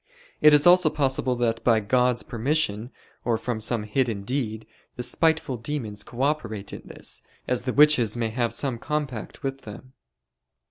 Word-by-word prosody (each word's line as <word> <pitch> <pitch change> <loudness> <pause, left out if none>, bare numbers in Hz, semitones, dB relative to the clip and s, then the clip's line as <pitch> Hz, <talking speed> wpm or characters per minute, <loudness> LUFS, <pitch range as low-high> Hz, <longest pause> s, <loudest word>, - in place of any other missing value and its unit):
It 150 - +8
is 150 0 +5
also 175 -2 +6
possible 130 -3 0
that 115 -2 -1
by 115 -2 +4
God's 125 +3 +1
permission, 120 -2 -1 0.3
or 115 -2 +1
from 120 -1 -3
some 115 0 -1
hidden 110 -2 -1
deed, 110 -2 -3 0.3
the 125 - -4
spiteful 160 +1 +1
demons 115 -4 -4
co 125 +4 -5
operate 115 -9 -2
in - - -7
this, - - -6 0.3
as 125 0 -1
the 125 - -1
witches 140 -7 +5
may 115 -1 -1
have 120 0 -1
some 130 -5 -2
compact 140 -7 -4
with 135 0 -3
them. 110 +5 -11
125 Hz, 165 wpm, -25 LUFS, 115-140 Hz, 0.3 s, It